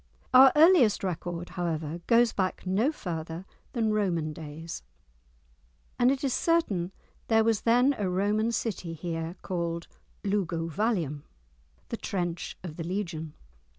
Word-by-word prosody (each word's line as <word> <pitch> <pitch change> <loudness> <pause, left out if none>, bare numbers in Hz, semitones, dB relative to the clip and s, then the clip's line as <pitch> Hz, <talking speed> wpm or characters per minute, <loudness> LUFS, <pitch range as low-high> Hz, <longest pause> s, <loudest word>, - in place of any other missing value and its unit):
Our 260 +1 +9
earliest 300 - +6
record, 175 -1 -3
however, 165 -2 -3
goes 235 0 +5
back 190 -1 -2
no 205 +10 +2
further 165 - -5 0.3
than 220 -3 +1
Roman 170 -7 0
days, 160 +1 -7 1.2
and 245 - +5
it 270 +1 0
is 270 -3 +1
certain 205 - +1 0.4
there 225 -1 +4
was 225 -2 +2
then 245 +4 +4
a 195 -3 0
Roman 205 +5 +1
city 195 -7 -3
here 165 +1 -4
called 170 -2 -3 0.4
Luguvallium 170 - -1 0.7
(the - - -3
trench 175 -3 -3
of 160 -4 -7
the 165 - -3
legion). 165 -4 -4
185 Hz, 125 wpm, -28 LUFS, 165-225 Hz, 1.2 s, Our